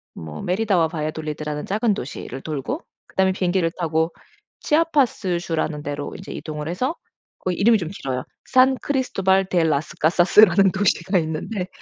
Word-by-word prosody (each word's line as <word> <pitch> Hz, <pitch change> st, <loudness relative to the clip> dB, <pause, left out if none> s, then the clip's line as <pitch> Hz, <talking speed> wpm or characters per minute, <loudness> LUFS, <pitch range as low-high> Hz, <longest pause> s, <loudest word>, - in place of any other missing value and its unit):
뭐 75 Hz, -1 st, -7 dB
메리다와 185 Hz, -3 st, +2 dB
바야돌리드라는 155 Hz, -1 st, -4 dB
작은 215 Hz, +2 st, +1 dB
도시를 130 Hz, 0 st, -6 dB
돌고 155 Hz, -, -4 dB, 0.3 s
그다음에 190 Hz, 0 st, +2 dB
비행기를 180 Hz, -2 st, +1 dB
타고 160 Hz, 0 st, +1 dB, 0.5 s
치아파스주라는 185 Hz, -, 0 dB
데로 145 Hz, 0 st, -4 dB
인제 190 Hz, -, -9 dB
이동을 150 Hz, -1 st, -6 dB
해서 255 Hz, -, -1 dB, 0.4 s
거기 180 Hz, -1 st, -2 dB
이름이 225 Hz, +2 st, +5 dB
좀 165 Hz, -2 st, -4 dB
길어요. 130 Hz, -9 st, -4 dB, 0.2 s
산크리스토발 255 Hz, -7 st, +2 dB
데 175 Hz, -2 st, +2 dB
라스 150 Hz, -2 st, 0 dB
카사스라는 185 Hz, +3 st, +5 dB
도시가 190 Hz, -1 st, +1 dB
있는데 175 Hz, +5 st, -3 dB
175 Hz, 375 characters per minute, -22 LUFS, 155-200 Hz, 0.5 s, 이름이